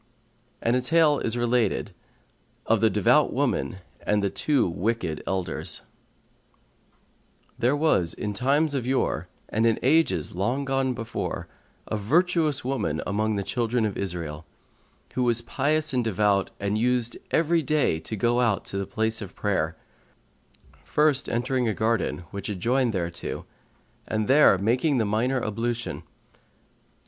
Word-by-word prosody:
And 115 +1 +2
a 125 - +2
tale 155 +2 +3
is 115 +1 -2
related 120 -3 0 0.7
of - - +2
the - - +5
THE - - -7
DEVOUT - - +4
WOMAN 70 +7 0 0.2
AND 105 -1 +1
THE 100 - 0
TWO 145 -5 +1
WICKED 90 -2 -2
ELDERS[FN#138] 95 -2 +1 1.8
There 125 +4 +2
was 145 - +2
in 105 -1 -3
times 145 +7 +1
of 130 -3 -2
yore 130 -10 0 0.2
and 110 +2 +2
in 115 - +2
ages 135 - +2
long 120 +10 -1
gone 135 -1 0
before, 115 -2 -4 0.4
a 110 - -2
virtuous 155 - +1
woman 110 - -1
among 110 +1 0
the 100 - -1
children 115 +3 0
of 105 - -2
Israel, 85 -6 -5 0.7
who 130 - -1
was 120 -1 +1
pious 150 +4 +1
and 125 -1 +1
devout 105 -2 +1
and 100 +2 -1
used 120 0 0
every 165 +1 +2
day 145 - +1
to 80 +7 -6
go 120 +3 +1
out 115 -5 +1
to 100 - -3
the 100 - -3
place 110 0 -1
of 95 -3 -8
prayer, 85 -6 -1 1.1
first 150 -2 +2
entering 125 +1 0
a 110 - 0
garden, 110 -4 0
which 100 0 -5
adjoined 120 +6 +1
thereto, 85 -2 -4 0.6
and 110 -1 -1
there 135 -6 +6
making 125 - +1
the 115 - +2
minor 120 +6 +1
ablution. 115 +2 -3
115 Hz, 145 wpm, -25 LUFS, 100-130 Hz, 1.8 s, there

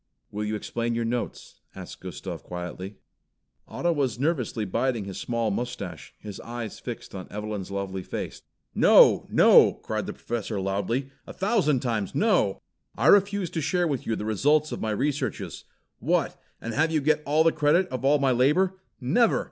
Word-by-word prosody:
"Will 105 +1 -3
you 105 +1 -2
explain 115 +2 -2
your 115 0 -1
notes?" 120 +1 -4 0.2
asked - - -9
Gustav - - -7
quietly. 90 +3 -7 0.7
Otto 175 - -1
was 135 -7 -1
nervously 130 -6 -1
biting 115 +2 -1
his 95 -1 -6
small 115 -2 -1
moustache, 120 - -5
his 105 -2 -9
eyes 115 -2 -6
fixed - - -7
on 95 -2 -7
Evelyn's 105 -2 -5
lovely 100 -1 -4
face. - - -6 0.3
"No! - - +6
No!" - - +6
cried - - -4
the - - -4
Professor 115 -3 -4
loudly, 100 +8 -2 0.2
"a - - -8
thousand 190 - +1
times 110 -6 -2
no! 185 - +2 0.3
I 115 - -1
refuse 200 -3 +4
to 160 - -2
share 175 +3 +1
with 140 -6 -3
you 115 - 0
the 105 - -5
results 145 +8 +2
of - - -5
my 110 - -1
researches. 135 +7 -2 0.3
What, - - 0 0.2
and 115 - -5
have 160 +6 +2
you 160 -1 +1
get 150 +1 +1
the 155 +3 +3
credit 155 +4 +3
of 130 -1 -5
all 145 +2 +4
my 135 -2 +2
labor? 155 +10 +2 0.2
Never!" 180 - +3
125 Hz, 170 wpm, -26 LUFS, 105-150 Hz, 0.7 s, No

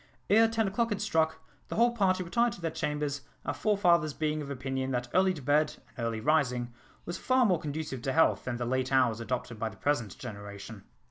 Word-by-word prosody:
Ere 225 +2 +7
ten 225 -1 0
o'clock 230 +4 0
had 205 -2 -2
struck, 160 -6 +1 0.3
the - - -5
whole 235 +2 +4
party 190 -5 +1
retired 235 +6 +1
to - - -11
their 165 -2 -2
chambers, 150 -2 -2 0.2
our - - -1
forefathers 175 -8 +2
being 155 -1 -1
of 140 - -6
opinion 135 -1 -3
that 125 -1 -1
early 185 +1 +4
to 155 -7 -7
bed 150 +3 +2 0.2
and 120 - -5
early 115 -1 -2
rising 125 -3 +1 0.3
was 175 - -5
far 255 -1 +3
more 180 -6 +3
conducive 150 -4 -4
to 135 - -1
health 160 - +3
than 120 -1 -2
the 120 - -2
late 130 +1 -1
hours 125 -4 +3
adopted 120 -1 -4
by 115 - -1
the 105 - -14
present 120 -3 -1
generation. 100 -2 -8
150 Hz, 210 wpm, -30 LUFS, 125-185 Hz, 0.3 s, Ere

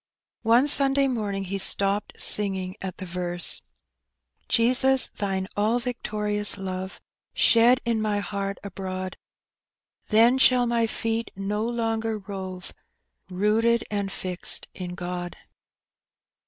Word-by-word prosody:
One 235 +4 +4
Sunday 275 -1 +5
morning 210 -6 -2
he 195 +1 -4
stopped 200 +1 0
singing 190 -3 +3
at 190 -2 -6
the 190 - -7
verse 175 0 -2 0.3
— - - -58
*' - - -47
Jesus, 255 +3 +4
Thine 195 -2 -3
all 215 +3 +1
victorious 210 -4 -2
love 190 -1 -6 0.4
Shed 240 +2 +5
in 230 -2 0
my 210 -1 0
heart 200 -1 -4
abroad, 185 -1 -6 0.9
Then 230 +4 +4
shall 250 -1 +5
my 235 -1 +1
feet 225 +1 -3
no 205 +2 -3
longer 225 -2 -2
rove, 190 -2 -8 0.6
Rooted 220 +5 +1
and 200 -1 -2
fixed 185 -2 -4
in 180 -1 -7
God." 175 0 -6
205 Hz, 120 wpm, -25 LUFS, 190-230 Hz, 0.9 s, Sunday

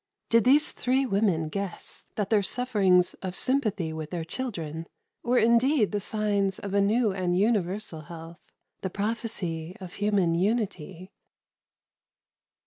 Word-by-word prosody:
Did 230 0 +4
these 290 +4 +5
three 260 +2 +1
women 195 -8 +1
guess 195 +3 -6
that 205 -1 -2
their 215 -2 +5
sufferings 195 -6 +2
of 185 -1 -4
sympathy 210 -12 0
with 155 -1 -5
their 170 -1 -3
children 165 - -5 0.3
were 245 +1 +1
indeed 235 +1 +4
the 205 - 0
signs 205 -2 0
of 200 -1 -6
a 200 - +4
new 215 +2 +2
and 180 -2 0
universal 200 -4 0
health 165 +2 -10 0.4
the 190 - -2
prophecy 190 -5 -3
of 185 -1 -9
human 200 -5 +1
unity? 185 -2 -2
200 Hz, 135 wpm, -27 LUFS, 175-225 Hz, 0.4 s, these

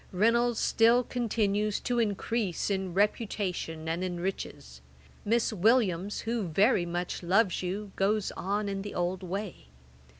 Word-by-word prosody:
'Reynolds 230 +4 +2
still 235 +2 +4
continues 215 -4 0
to 245 -1 0
increase 210 -2 -1
in 190 -3 -2
reputation 195 -6 -1
and 165 +3 -1
in 180 -2 -3
riches. 190 +2 -5 0.4
Miss 225 +1 +1
Williams, 205 -2 +2
who 230 -4 -2
very 185 +2 +3
much 175 +1 -3
loves 190 +2 +2
you, 195 +3 -4
goes 205 +1 +1
on 205 +2 -2
in 195 -1 -3
the 205 +1 -7
old 180 +1 -1
way. 190 - -5
200 Hz, 135 wpm, -29 LUFS, 180-225 Hz, 0.4 s, still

